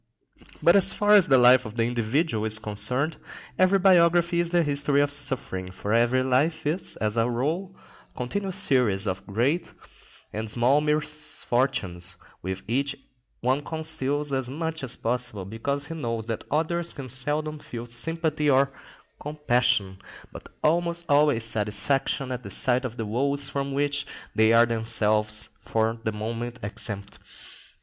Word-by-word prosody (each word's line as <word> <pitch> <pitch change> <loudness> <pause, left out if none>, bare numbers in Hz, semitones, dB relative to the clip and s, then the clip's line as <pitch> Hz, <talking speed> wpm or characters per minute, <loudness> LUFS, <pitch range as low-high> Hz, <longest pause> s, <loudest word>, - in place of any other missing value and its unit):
But 170 - +6
as 195 - +5
far 210 0 +3
as 200 -4 +7
the 135 - +5
life 125 +1 +6
of 110 -2 -9
the 115 - +1
individual 120 +1 -1
is 110 0 +2
concerned, 110 +8 0 0.4
every 185 +1 +4
biography 175 -2 +4
is 170 -1 0
the 175 0 +2
history 145 -1 +1
of 145 0 +2
suffering, 135 -10 0
for 100 +3 -4
every 120 +2 +3
life 145 +5 0
is, 165 +5 -3
as 105 +1 -2
a 115 +1 +2
rule, 160 +11 -2 0.4
a - - -29
continual 190 +11 -3
series 120 - +1
of 95 -2 -3
great 135 - -1 0.6
and 110 +1 -4
small 125 +6 +2
misfortunes, 135 - -1 0.3
which 95 +1 -5
each 140 +4 -1 0.5
one 130 +4 +1
conceals 150 -2 -2
as 130 -2 -1
much 160 +2 -4
as 125 -2 0
possible, 120 -4 -3
because 140 +8 -3
he 165 - -7
knows 115 -8 -4
that 115 -1 -5
others 165 +3 -1
can 135 -2 -7
seldom 150 +5 -2
feel 120 -4 -8
sympathy 155 +5 -2
or 135 0 +3 0.5
compassion, 120 -9 0 0.3
but - - -11
almost 170 +1 +1
always 145 -5 +3
satisfaction 110 +5 +1
at 125 -1 -4
the - - -9
sight 125 +1 +3
of 120 -1 -6
the 115 - -3
woes 140 +5 0
from 140 0 -3
which 145 +1 0 0.3
they 110 0 +4
are 115 +1 +6
themselves 110 -2 0
for 115 +1 -1
the 110 - 0
moment 115 +3 -5
exempt. 100 0 -3
130 Hz, 155 wpm, -25 LUFS, 115-150 Hz, 0.6 s, as